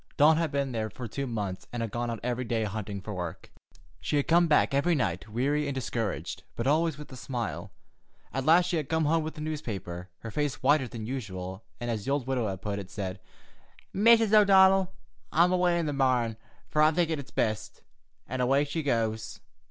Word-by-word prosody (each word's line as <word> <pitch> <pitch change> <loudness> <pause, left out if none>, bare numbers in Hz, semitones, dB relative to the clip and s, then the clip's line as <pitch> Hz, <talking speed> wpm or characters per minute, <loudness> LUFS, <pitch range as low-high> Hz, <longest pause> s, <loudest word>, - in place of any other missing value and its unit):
Dawn 155 +2 +6
had 165 -3 0
been 140 -2 -1
there 110 -2 -2
for 120 +3 -7
two 135 +5 -4
months, 105 -6 -4
and 120 -1 -3
had 115 - -4
gone 120 +1 -2
out 115 -2 -3
every 125 +1 -1
day 115 -2 -1
hunting 100 -2 -4
work. 90 -6 -6 0.5
She - - -2
had 140 - 0
come 170 +1 +5
back 150 -2 +3
every 160 +5 +3
night 95 - -1
weary 140 +6 0
and 140 - -3
discouraged, 115 -5 -3
but 115 - -3
always 155 +2 +2
with 150 -1 -10
a - - -8
smile. 120 -2 -4 0.6
At 135 - -1
last 165 +5 +5
she 180 -1 0
had 150 -3 -3
come 160 -1 +1
home 160 +2 +2
with 160 +1 -6
a - - -5
newspaper, 100 - -5
her 115 - -6
face 145 +1 -2
whiter 140 -1 +4
than 115 -2 -7
usual, 95 -6 -5 0.2
and, 120 -1 -2
as 110 -3 -3
the - - -3
old 140 -3 0
widow 130 -4 0
had 95 -2 -5
put 100 -1 -2
it, 95 -2 -8
said: 95 -3 -5 0.7
"'Mrs. 225 +1 +5
O'Donnell, 195 -2 +6 0.4
I'm 170 +3 +4
away 180 -1 +3
in 170 - 0
the 150 - -1
marn, 125 -4 +1 0.4
fer 150 - +3
I'm 155 0 +5
thinkin' 165 -3 +1
it's 140 - -8
best;' 110 -1 -2 0.4
and 130 0 -3
away 135 +3 +3
she 150 +3 -3
goes." 115 -5 -1
130 Hz, 205 wpm, -28 LUFS, 110-155 Hz, 0.7 s, Dawn